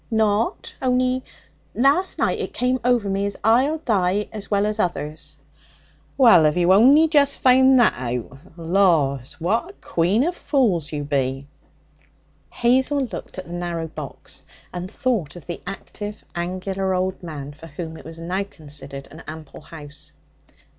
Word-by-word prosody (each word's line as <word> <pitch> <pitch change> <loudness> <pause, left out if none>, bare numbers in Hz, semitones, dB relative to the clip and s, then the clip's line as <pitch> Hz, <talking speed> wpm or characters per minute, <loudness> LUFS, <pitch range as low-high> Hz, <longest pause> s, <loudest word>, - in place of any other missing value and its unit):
'Nought. 220 - 0
Only 255 0 +1 0.5
last 285 +9 +2
night - - 0
it - - -4
came 255 +1 +1
o'er 245 -1 +3
me 195 +1 0
as 200 - -5
I'll 255 +8 +3
die 205 - 0
as 210 -2 -6
well 200 0 +2
as 215 +1 -2
others.' 155 -5 -3 0.8
'Well, 230 - +7
have 150 +2 +2
you 180 +1 +4
only 275 +10 +6
just 285 -3 +3
found 260 +1 +6
that 240 -3 +5
out? 125 0 -4 0.2
Laws! 165 -7 +2
what 220 - 0
a - - -12
queen 190 - +1
of 345 +4 0
fools 225 - +1
you 145 -2 -3
be!' 135 -1 -1 1.0
Hazel 260 +4 +2
looked 245 -6 -6
at 185 - -4
the 170 - -9
narrow 175 -2 -3
box, 150 -3 -9 0.3
and 180 +1 -5
thought 220 - -1
of 175 - -11
the 175 - -6
active, 205 +1 -7
angular 185 +2 -2
old 185 +1 -2
man 150 -5 -7
for 160 +3 -12
whom 160 +1 -7
it - - -11
was 165 +1 -10
now 180 +4 -2
considered 145 -6 -9
an 160 - -11
ample 155 -1 -9
house. 150 -1 -11
190 Hz, 155 wpm, -22 LUFS, 160-245 Hz, 1.0 s, Well